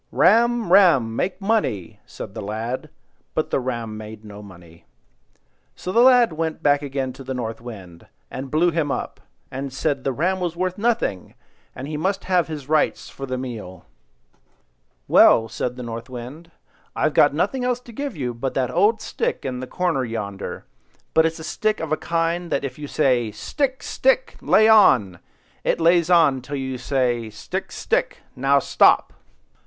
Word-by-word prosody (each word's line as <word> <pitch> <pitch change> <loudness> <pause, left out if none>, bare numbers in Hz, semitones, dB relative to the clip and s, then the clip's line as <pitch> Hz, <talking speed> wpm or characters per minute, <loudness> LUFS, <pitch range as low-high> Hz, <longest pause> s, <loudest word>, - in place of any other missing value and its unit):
"Ram, 230 -1 +3
ram! 135 - +5
Make 185 +10 -2
money!" 195 - -1
said 95 - -9
the 110 - -6
lad; 115 +8 -4 0.5
but 155 - -1
the - - +2
ram 120 -4 -4
made 110 0 -10
no 105 0 -10
money. 85 -5 -15 0.9
So 180 - -5
the 230 - +3
lad 245 -6 +6
went 160 0 -3
back 145 0 +3
again 135 -2 -3
to 135 - -11
the 130 0 -5
North 115 -2 -4
Wind, 95 -8 -11 0.2
and 135 +1 -6
blew 165 +5 +2
him 155 -3 -1
up, - - -4 0.3
and 135 +1 -5
said 140 0 -2
the 135 - 0
ram 180 +8 0
was 175 -2 -2
worth 185 +2 -2
nothing, 225 - -1 0.4
and 135 - -6
he 150 0 -4
must 190 +5 -1
have 180 -2 +1
his 150 -4 -7
rights 155 0 +1
for 135 - -7
the 130 0 -3
meal. 115 -8 -7 1.2
"Well," 115 - +6
said 125 +2 -4
the 125 - -7
North 115 +1 -7
Wind, 130 +7 -9 0.5
"I've 155 -1 0 0.2
nothing 195 - -1
else 250 -1 0
to 245 - -13
give 275 - -5
you 125 -4 -3
but 125 +3 -4
that 130 -2 0
old 210 +6 +2
stick - - -3
in 125 -2 -3
the 130 - -6
corner 175 -6 -1
yonder; 105 -5 -5 0.5
but 160 0 +5
it's 160 - -5
a 160 - -9
stick 215 +6 -1
of 160 - -5
that 155 - 0
kind 170 +1 -1
that - - 0
if 130 +1 -7
you 145 - -6
say— 125 -6 +1
'Stick, 260 - -3
stick! - - +1
lay 220 - +4
on!' 120 - +5 0.4
it - - 0
lays 170 0 +3
on 160 -7 +4
till 140 +3 -6
you 130 -2 -4
say, 125 -4 0
'Stick, 110 - -6
stick! - - -1 0.2
now 135 +2 +3
stop! 140 - +3
140 Hz, 175 wpm, -22 LUFS, 120-175 Hz, 1.2 s, lad